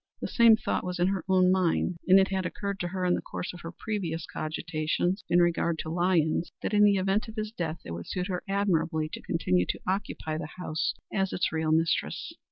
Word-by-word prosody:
The -, -, -3 dB
same 230 Hz, -2 st, +6 dB
thought -, -, -1 dB
was 180 Hz, 0 st, -3 dB
in 175 Hz, +1 st, +2 dB
her 195 Hz, -4 st, -1 dB
own 185 Hz, -1 st, +5 dB
mind, 180 Hz, -1 st, +1 dB
and 190 Hz, +1 st, +8 dB
it 190 Hz, -, +3 dB
had 190 Hz, -1 st, -1 dB
occurred 200 Hz, +2 st, -4 dB
to 175 Hz, -, -2 dB
her 185 Hz, +1 st, -2 dB
in 180 Hz, -, +3 dB
the -, -, 0 dB
course 180 Hz, -, -5 dB
of 175 Hz, -, -10 dB
her 165 Hz, -, -6 dB
previous 170 Hz, -5 st, -3 dB
cogitations 160 Hz, +4 st, -2 dB
in 175 Hz, -, +5 dB
regard 170 Hz, -1 st, +1 dB
to 160 Hz, -, -6 dB
Lyons, 170 Hz, -2 st, +1 dB
that -, -, -2 dB
in 210 Hz, 0 st, +5 dB
the 205 Hz, -1 st, +6 dB
event 195 Hz, +4 st, +1 dB
of 220 Hz, -, -9 dB
his 215 Hz, -1 st, -3 dB
death 170 Hz, -6 st, -3 dB
it -, -, -7 dB
would 85 Hz, 0 st, -6 dB
suit 180 Hz, -1 st, -2 dB
her 180 Hz, -2 st, -3 dB
admirably 170 Hz, -5 st, +1 dB
to -, -, -5 dB
continue 90 Hz, -, +1 dB
to -, -, -1 dB
occupy 180 Hz, -5 st, -2 dB
the 155 Hz, -2 st, -7 dB
house 160 Hz, -3 st, -2 dB, 0.2 s
as 195 Hz, -1 st, 0 dB
its -, -, 0 dB
real 160 Hz, -1 st, 0 dB
mistress. 165 Hz, +1 st, 0 dB
180 Hz, 225 wpm, -28 LUFS, 160-195 Hz, 0.2 s, and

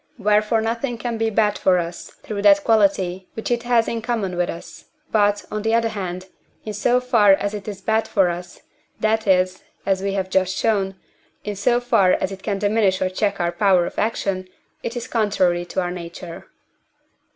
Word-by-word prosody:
Wherefore 210 Hz, +2 st, +2 dB
nothing 235 Hz, +2 st, -2 dB
can 230 Hz, -1 st, -4 dB
be 225 Hz, 0 st, +1 dB
bad 210 Hz, -1 st, +1 dB
for 185 Hz, -1 st, +3 dB
us 170 Hz, 0 st, -4 dB
through 205 Hz, -2 st, -4 dB
that 200 Hz, -1 st, +5 dB
quality 190 Hz, -4 st, +2 dB
which 220 Hz, -, -4 dB
it 240 Hz, -1 st, +1 dB
has 240 Hz, -1 st, +2 dB
in 230 Hz, -1 st, -2 dB
common 220 Hz, -6 st, -2 dB
with 175 Hz, 0 st, 0 dB
us, 170 Hz, -, -9 dB, 0.3 s
but, 205 Hz, -1 st, +2 dB
on 215 Hz, -, -2 dB
the 225 Hz, +1 st, +1 dB
other 230 Hz, -1 st, +2 dB
hand, 185 Hz, -3 st, -5 dB, 0.4 s
in 215 Hz, -, -4 dB
so 240 Hz, +4 st, +2 dB
far 230 Hz, -6 st, +4 dB
as 200 Hz, +1 st, -1 dB
it 205 Hz, -1 st, -7 dB
is 200 Hz, -2 st, -6 dB
bad 220 Hz, +2 st, +1 dB
for 195 Hz, -3 st, +3 dB
us, 175 Hz, +1 st, -7 dB, 0.4 s
that 220 Hz, 0 st, +1 dB
is 185 Hz, -1 st, +2 dB, 0.2 s
(as 195 Hz, -1 st, +1 dB
we 195 Hz, 0 st, -1 dB
have 190 Hz, -1 st, -2 dB
just 190 Hz, 0 st, +1 dB
shown), 195 Hz, -4 st, 0 dB, 0.5 s
in 210 Hz, 0 st, -4 dB
so 240 Hz, +5 st, +2 dB
far 225 Hz, -7 st, +3 dB
as 190 Hz, -, -1 dB
it 195 Hz, 0 st, -8 dB
can 200 Hz, -1 st, -2 dB
diminish 205 Hz, -2 st, +2 dB
or 185 Hz, -, 0 dB
check 200 Hz, +1 st, -1 dB
our 170 Hz, 0 st, 0 dB
power 180 Hz, -1 st, +3 dB
of -, -, -5 dB
action, 195 Hz, -4 st, -1 dB, 0.3 s
it 235 Hz, -, -4 dB
is 240 Hz, -, -5 dB
contrary 185 Hz, -6 st, +1 dB
to 175 Hz, -, -3 dB
our 175 Hz, -1 st, -2 dB
nature. 170 Hz, -1 st, -8 dB
200 Hz, 195 wpm, -21 LUFS, 185-225 Hz, 0.5 s, that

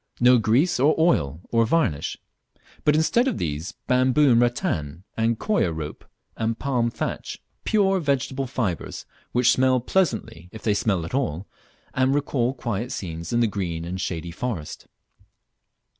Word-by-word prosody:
no 125 Hz, 0 st, +6 dB
grease, 125 Hz, -, +2 dB
or 145 Hz, +4 st, +4 dB
oil, 80 Hz, -, +2 dB
or 115 Hz, -1 st, +4 dB
varnish; 115 Hz, -, 0 dB, 0.7 s
but 150 Hz, -, +4 dB
instead 235 Hz, -, +3 dB
of 255 Hz, -, 0 dB
these, 80 Hz, +2 st, -3 dB
bamboo 130 Hz, +3 st, +4 dB
and 115 Hz, 0 st, +5 dB
rattan, 90 Hz, -, -1 dB
and 115 Hz, 0 st, +1 dB
coir 205 Hz, -, +1 dB
rope 80 Hz, -2 st, -6 dB, 0.3 s
and 115 Hz, 0 st, -1 dB
palm 125 Hz, -4 st, 0 dB
thatch; -, -, -4 dB, 0.3 s
pure 195 Hz, -3 st, +3 dB
vegetable 135 Hz, -3 st, -1 dB
fibres, 110 Hz, -9 st, -3 dB, 0.3 s
which 120 Hz, 0 st, +4 dB
smell 130 Hz, 0 st, +3 dB
pleasantly 115 Hz, -, -1 dB
if 110 Hz, -, -10 dB
they 105 Hz, -, +2 dB
smell 95 Hz, -5 st, 0 dB
at -, -, -8 dB
all, 95 Hz, -, -1 dB, 0.5 s
and 130 Hz, +2 st, +2 dB
recall 135 Hz, -4 st, 0 dB
quiet 120 Hz, -1 st, -3 dB
scenes 85 Hz, -8 st, -5 dB
in 120 Hz, 0 st, +2 dB
the -, -, +4 dB
green 85 Hz, -5 st, -3 dB
and 90 Hz, +2 st, -4 dB
shady 85 Hz, -2 st, -3 dB
forest. 90 Hz, -6 st, -5 dB
120 Hz, 150 wpm, -24 LUFS, 90-135 Hz, 0.7 s, no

